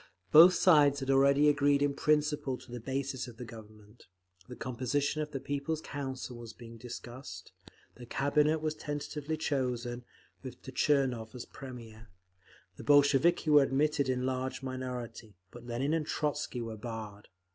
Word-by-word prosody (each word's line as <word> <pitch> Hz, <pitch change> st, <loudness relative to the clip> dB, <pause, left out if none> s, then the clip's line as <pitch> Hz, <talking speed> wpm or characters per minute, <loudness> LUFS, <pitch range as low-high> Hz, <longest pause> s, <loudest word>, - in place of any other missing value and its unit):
Both 170 Hz, +4 st, +9 dB
sides 145 Hz, -6 st, +5 dB
had 135 Hz, 0 st, 0 dB
already 140 Hz, +2 st, +5 dB
agreed 145 Hz, -1 st, +3 dB
in 145 Hz, -1 st, +1 dB
principle 150 Hz, -2 st, +1 dB
to 130 Hz, -1 st, -15 dB
the 120 Hz, -, -5 dB
basis 130 Hz, +1 st, -3 dB
of 120 Hz, -2 st, -11 dB
the 125 Hz, -, -7 dB
Government; 110 Hz, -1 st, -14 dB, 0.4 s
the -, -, -7 dB
composition 130 Hz, +5 st, -1 dB
of 150 Hz, -, -3 dB
the 140 Hz, -, -5 dB
People's 145 Hz, +4 st, -3 dB
Council 130 Hz, -4 st, -6 dB
was 115 Hz, -2 st, -9 dB
being 115 Hz, 0 st, -12 dB
discussed; 120 Hz, -4 st, -9 dB, 0.4 s
the 120 Hz, -1 st, -12 dB
Cabinet 150 Hz, +4 st, +1 dB
was 155 Hz, -1 st, 0 dB
tentatively 150 Hz, 0 st, -4 dB
chosen, 125 Hz, -5 st, -2 dB, 0.4 s
with -, -, -10 dB
Tchernov 130 Hz, -6 st, 0 dB
as 120 Hz, -, -7 dB
Premier; 115 Hz, -4 st, -11 dB, 0.7 s
the -, -, -9 dB
Bolsheviki 145 Hz, +3 st, +4 dB
were 145 Hz, -1 st, +8 dB
admitted 140 Hz, 0 st, +1 dB
in 125 Hz, -1 st, 0 dB
a -, -, -2 dB
large 130 Hz, 0 st, -3 dB
minority, 125 Hz, -4 st, -6 dB, 0.2 s
but 120 Hz, 0 st, -12 dB
Lenin 130 Hz, +6 st, -1 dB
and 160 Hz, -2 st, -1 dB
Trotzky 150 Hz, -4 st, -2 dB
were 115 Hz, -1 st, -6 dB
barred. 110 Hz, -3 st, -7 dB
135 Hz, 155 wpm, -31 LUFS, 120-145 Hz, 0.7 s, Both